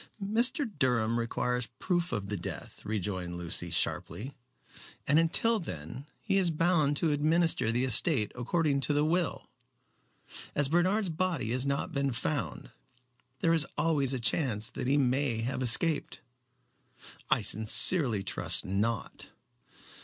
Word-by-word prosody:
"Mr. 235 +7 +2
Durham 120 -4 +1
requires 125 +1 -1
proof 175 -1 -1
of 100 -2 -3
the 105 - -2
death," 85 - -7
rejoined 95 -4 -4
Lucy, 85 0 -1
sharply; 110 +9 -2 0.7
"and 150 +3 +3
until 220 +7 +2
then, 90 - -8 0.2
he 195 -3 +1
is 180 -3 +1
bound 155 -3 +1
to 160 0 +1
administer 155 -4 +1
the 125 +3 0
estate 125 - +1
according 140 +3 0
to 145 - -1
the 145 +1 +2
will. 170 +1 -1 1.1
As 145 -2 +3
Bernard's 185 +5 +1
body 165 -8 -1
has 130 +2 0
not 140 +5 -2
been 140 -3 -1
found, 140 +2 -3 0.7
there 165 - +3
is 160 -3 +1
always 145 -5 +1
a 130 - -1
chance 115 -3 0
that - - -5
he 140 +2 +2
may 130 -3 +1
have 125 +3 -3
escaped." 145 +6 +1 1.1
"I - - +2
sincerely 110 - +4
trust 95 - +2
not." 100 +2 -3
140 Hz, 135 wpm, -29 LUFS, 115-165 Hz, 1.1 s, sincerely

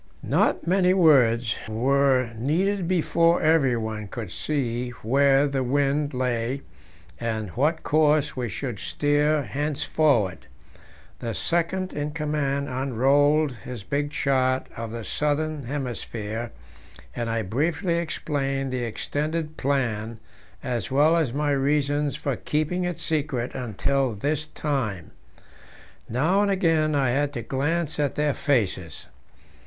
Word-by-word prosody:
Not - - +1
many 185 +1 +3
words 125 -9 +4 0.2
were 130 +2 +2
needed 175 - 0
before 170 -1 +2
everyone 120 -9 +1
could 105 -2 -6
see 125 -5 -2
where 135 +4 +4
the 140 -1 -1
wind 140 +2 0
lay, 125 +1 -1 0.6
and 110 -3 -2
what 150 - 0
course 150 -1 +2
we 125 -3 -2
should 115 +2 -4
steer 145 +1 +1
henceforward. 140 -7 0 0.7
The 115 -2 -4
second 180 +2 -1
in 150 0 -3
command 145 -3 -1
unrolled 140 +4 +2
his 115 -1 -8
big 145 +8 -1
chart 130 -2 +1
of 115 0 -5
the 115 0 -6
southern 150 +5 -1
hemisphere, 120 -4 -4 0.6
and 120 -1 -2
I 115 -1 -1
briefly 160 - 0
explained 135 -5 -2
the 125 -1 -1
extended 150 +7 -3
plan, 115 -6 -1 0.4
as 120 -7 -2
well 150 +5 +4
as 160 -7 +1
my 145 +2 0
reasons 145 +1 +1
for 140 -3 -2
keeping 155 +8 -1
it 175 -2 -3
secret 145 -7 -1
until 125 +2 -1
this 145 +8 -1
time. 115 - -3 1.0
Now 160 - +2
and 205 - +2
again 165 -5 +2
I 135 -3 +2
had 145 +2 +1
to 120 -4 -4
glance 150 +6 -1
at 145 -3 0
their 150 -1 +1
faces. 100 - -1
140 Hz, 125 wpm, -25 LUFS, 120-150 Hz, 1.0 s, words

